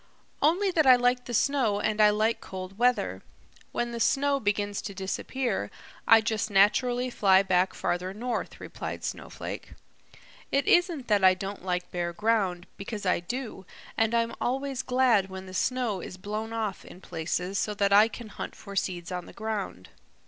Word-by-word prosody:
"Only 365 +6 +3
that 315 -5 +2
I 255 - +10
like 245 0 +1
the 240 - -6
snow 245 -6 +2
and 215 +1 +1
I 210 - +7
like 215 +2 +1
cold 190 +2 -8
weather. 250 +1 +1 0.5
When 240 0 -2
the 235 - -5
snow 280 +4 +2
begins 205 -2 -1
to 200 - -7
disappear, 195 - -2 0.4
I 225 0 +8
just 220 0 -1
naturally 245 +5 +3
fly 195 -4 +4
back 185 -1 +2
farther 180 +1 -2
north," 240 +5 -4
replied - - -6
Snowflake. - - -6 0.8
"It 275 +1 +2
isn't 345 -7 +3
that 205 -3 +2
I 185 0 +7
don't 195 0 -6
like 180 -1 -2
bare 175 -1 -2
ground, 195 -4 0
because 205 +1 -6
I 180 - +2
do, 225 +2 -5 0.3
and 225 +1 +2
I'm 230 0 +1
always 270 +1 -1
glad 250 -7 +2
when 190 0 -7
the 185 - -10
snow 240 -1 0
is 185 - -8
blown 215 +4 -4
off 220 -4 -3
in 180 - -13
places 180 +3 -3
so 210 - -1
that 200 -1 +2
I 210 +2 +7
can 230 -1 -9
hunt - - -7
for 200 - -10
seeds 180 -2 -2
on 180 -1 -4
the - - -12
ground. 210 - -4
210 Hz, 175 wpm, -28 LUFS, 190-245 Hz, 0.8 s, I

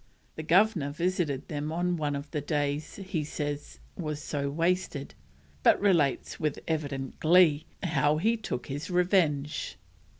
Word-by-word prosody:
The - - -4
Governor 170 -2 +3
visited 155 -3 -1
them 150 0 -3
on 175 +2 0
one 150 -3 -1
of 140 +1 -6
the 150 - -2
days 145 0 -1
he 190 -5 -3
says 145 -1 -4 0.2
was 150 -4 -4
so 145 -2 -2
wasted, 165 -2 -1 0.5
but - - +5
relates, 170 -9 +2
with 150 -3 -1
evident 145 -4 -3
glee, 160 -2 +5 0.2
how 155 -3 +2
he 220 +8 +2
took 215 - -4
his 145 +5 -5
revenge. 170 -5 +1
155 Hz, 140 wpm, -29 LUFS, 145-175 Hz, 0.5 s, but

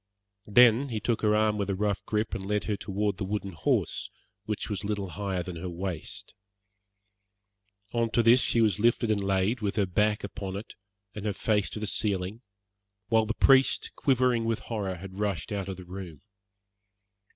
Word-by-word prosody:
Then 120 +4 +6
he 110 -3 -2
took 115 +2 -1
her 105 -1 +3
arm 105 -1 +2
with 100 -1 -1
a 100 - 0
rough 100 0 -1
grip 110 +1 -1
and 95 - -3
led 105 +1 -1
her 105 - -1
toward 100 0 -2
the - - -3
wooden 100 0 -3
horse, 80 - -1 0.4
which 105 -1 -3
was 100 -4 -3
little 100 -2 -2
higher 95 0 -3
than 90 -1 -7
her 90 +2 -5
waist. 90 -1 -6 1.6
On 115 -1 +1
to 120 +1 +2
this 115 +3 +7
she 115 - +2
was 105 -3 +2
lifted 115 0 +2
and 100 -2 +1
laid, 95 +4 +1
with 100 -2 -1
her 105 -3 +2
back 105 +3 +1
upon 100 -2 -5
it, 105 +3 -7 0.4
and 105 - -7
her 105 - 0
face 105 0 0
to - - -6
the 105 - -3
ceiling, 100 +1 0 0.7
while 110 -1 +3
the 115 - -2
priest, 135 0 +4
quivering 125 -3 +2
with 115 -1 -1
horror, 100 -5 -3
had 95 +2 -9
rushed 105 0 -2
out 100 -2 -3
of 95 - -5
the 90 - -10
room. 90 -5 -8
105 Hz, 185 wpm, -28 LUFS, 95-110 Hz, 1.6 s, this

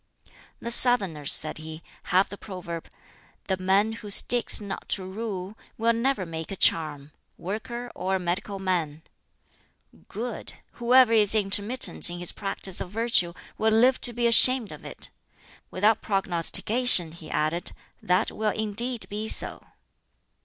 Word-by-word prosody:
"The 235 - -4
Southerners," 195 - +4
said 155 0 +1
he, 160 +1 -10 0.2
"have 185 +2 +1
the - - -8
proverb, 175 -4 -9 0.6
'The 190 - -2
man 195 +4 +1
who 220 -2 -9
sticks 240 +4 +5
not 200 -2 -8
to 190 - -1
rule 195 -1 -7 0.2
will 230 +1 +1
never 230 -3 -2
make 160 -1 -8
a 195 - -5
charm 150 -5 -1 0.3
worker 235 +6 -7
or 190 +1 -3
a - - -2
medical 185 +3 -4
man,' 170 -5 -3 1.0
Good! 230 +2 -5 0.2
'Whoever 240 0 +3
is 215 -1 +4
intermittent 205 +2 +4
in 175 - -7
his 175 0 0
practise 195 -2 -3
of - - -6
virtue 215 -5 0 0.3
will 220 - +1
live 250 +4 +3
to 245 - +4
be 240 0 -3
ashamed 235 0 +4
of - - -12
it.' - - -7 0.6
Without 210 +4 +1
prognostication," 195 +1 +1
he 165 -1 -13
added, 155 +3 -2 0.3
"that 180 +4 0
will 215 0 -2
indeed 220 +3 -2
be 210 +2 -5
so." - - +2
200 Hz, 145 wpm, -25 LUFS, 175-230 Hz, 1.0 s, sticks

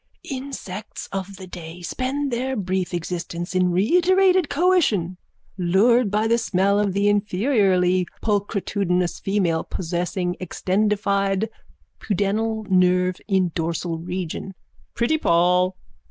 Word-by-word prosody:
_ - - -50 0.3
Insects 255 -7 -6
of 195 0 -4
the 190 - -9
day 175 -1 -9
spend 265 - -2
their 260 +2 -1
brief 185 -3 -2
existence 175 0 -4
in 185 -1 +2
reiterated 360 - +3
coition, 280 - +2 0.4
lured 205 +6 +3
by 210 +2 +1
the 235 +1 +3
smell 200 0 +1
of 205 -2 +1
the 200 +1 +1
inferiorly 195 -3 +2 0.2
pulchritudinous 200 -4 0
female 185 -5 0
possessing 180 +1 -2
extendified 200 +2 0 0.5
pudendal 215 +2 -1
nerve 180 -1 +3
in 190 -4 +2
dorsal 165 0 -2
region. 180 +2 -5 0.4
Pretty 240 +7 +1
Poll! 180 - +3
195 Hz, 110 wpm, -23 LUFS, 180-220 Hz, 0.5 s, reiterated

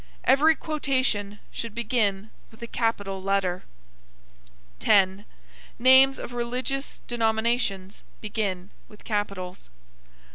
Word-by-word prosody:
Every 315 +4 +5
quotation 260 -10 -1
should 230 -2 -6
begin 220 -4 0 0.2
with 220 - -19
a - - -3
capital 205 -5 -2
letter. 190 -2 -1 1.1
10. 195 +1 +3 0.5
Names 260 +2 +7
of 245 - -7
religious 250 +3 -4
denominations 220 -4 -1 0.2
begin 200 -3 -3 0.2
with 210 - -17
capitals. 195 - -4
220 Hz, 95 wpm, -25 LUFS, 195-245 Hz, 1.1 s, Names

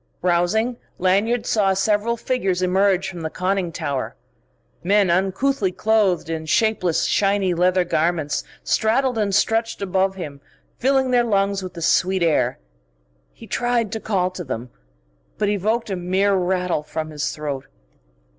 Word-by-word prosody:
Rousing, 185 +7 +1 0.2
Lanyard 205 +6 +1
saw 195 -3 +2
several 210 +4 +1
figures 195 -7 -1
emerge 190 +1 +2
from 175 -3 -7
the 160 - -3
conning 185 0 -1
tower. 140 -4 -3 0.7
Men 200 0 +3
uncouthly 195 +4 +1
clothed 205 -4 +1
in 160 -1 -4
shapeless, 190 -3 +1
shiny 195 -2 +2
leather 180 +1 +2
garments, 160 -4 0 0.2
straddled 245 +2 +1
and 200 -2 +1
stretched 225 +2 +1
above 190 0 0
him, 145 -7 -7 0.4
filling 265 0 +2
their 245 -1 +4
lungs 200 -3 +1
with 185 -1 -8
the 170 - -5
sweet 185 +2 +2
air. 165 -2 +1 0.7
He - - -14
tried 240 -3 0
to 220 - -3
call 185 -4 0
to 185 -1 -6
them, 125 -4 -6 0.7
but 205 - 0
evoked 210 +2 -1
a - - 0
mere 185 +3 +1
rattle 180 -3 0
from 155 +1 -5
his 150 -1 -2
throat. 145 -3 -5
190 Hz, 145 wpm, -22 LUFS, 175-215 Hz, 0.7 s, their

